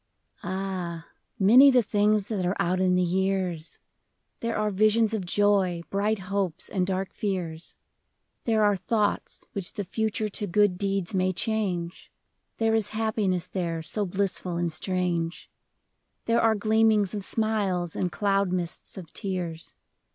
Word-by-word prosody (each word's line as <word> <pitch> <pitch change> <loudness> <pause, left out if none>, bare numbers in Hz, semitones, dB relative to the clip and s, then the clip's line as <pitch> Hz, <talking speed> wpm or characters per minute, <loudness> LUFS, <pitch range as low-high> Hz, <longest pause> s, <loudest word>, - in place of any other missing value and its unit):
ilH, 185 -3 -3 0.3
many 240 +7 +8
the 250 -3 +4
things 210 0 +2
that 205 -5 -1
are 180 +2 0
out 180 +2 +1
in 185 -1 +3
the 180 - +3
years! 185 -2 -1 0.6
There 230 - -2
are 215 0 0
visions 215 +2 +3
of 205 -4 -2
joy, 190 -3 +2
bright 210 +2 +1
hopes 190 -3 -2
and 185 -3 0
dark 190 0 -2
fears, 175 -5 -3 0.7
There 220 -2 +3
are 205 -1 +4
thoughts 210 +2 -1
which 195 -3 -5
the 205 - -3
future 215 +2 -1
to 205 0 -3
good 190 0 +2
deeds 195 -2 -1
may 185 0 +2
change. 185 -4 -2 0.5
There 225 0 +2
is 220 -2 +1
happiness 210 -5 0
there 170 -3 -3
so 205 +5 0
blissful 185 -2 -2
and 170 -1 -1
strange, 175 -1 -2 0.7
There 230 0 +3
are 225 -1 +4
gleamings 215 -1 +3
of 205 -2 -3
smiles 195 -6 0
and 180 - -1
cloud 195 +3 +1
mists 180 +2 -3
of 175 -4 -9
tears. 180 -5 -4
195 Hz, 145 wpm, -26 LUFS, 180-210 Hz, 0.7 s, many